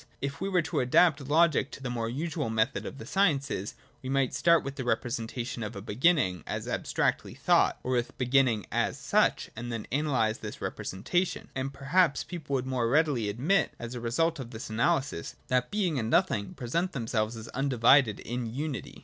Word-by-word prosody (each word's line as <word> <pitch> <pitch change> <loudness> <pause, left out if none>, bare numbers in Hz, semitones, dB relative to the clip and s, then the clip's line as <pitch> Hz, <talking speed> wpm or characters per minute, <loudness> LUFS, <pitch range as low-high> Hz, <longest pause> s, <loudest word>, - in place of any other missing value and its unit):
— - - -33
If 140 +3 -4
we 195 - -1
were 180 -3 +2
to - - -1
adapt 140 +4 +4
logic 155 -2 +3
to 140 - -9
the 125 - -3
more 115 -2 -2
usual 150 +1 -3
method 110 +3 0
of - - -8
the 110 - -8
sciences, 140 - 0 0.3
we 130 - -6
might 135 -2 +1
start 170 -1 +4
with 140 - -4
the 135 - -5
representation 120 0 -2
of 110 +1 -5
a - - -5
Beginning 110 - +2
as - - -4
abstractly - - -1
thought, - - +3
or 130 - -2
with 120 -1 -1
Beginning 125 -5 +2
as - - 0
such, - - +1
and 120 +2 -5
then 115 -2 -4
analyse 130 -6 +1
this - - -7
repre - - -5
sentation; 175 - -1
and 135 +1 -3
perhaps 140 +3 +2
people 155 -6 -4
would 130 -1 -1
more 130 -3 0
readily 140 -6 +2
admit, 145 - +1
as 120 +1 -6
a 120 - -5
result 165 +8 0
of 125 -3 -6
this 110 -2 -7
analysis, 115 - 0
that 125 0 +1
Being 185 -9 0
and 110 -1 -2
Nothing 100 -3 +1
present 170 +10 -2
themselves 115 -3 -1
as 110 0 -8
undivided 130 -3 +3
in 120 0 -4
unity. 140 +2 -4
130 Hz, 190 wpm, -29 LUFS, 115-150 Hz, 0.3 s, adapt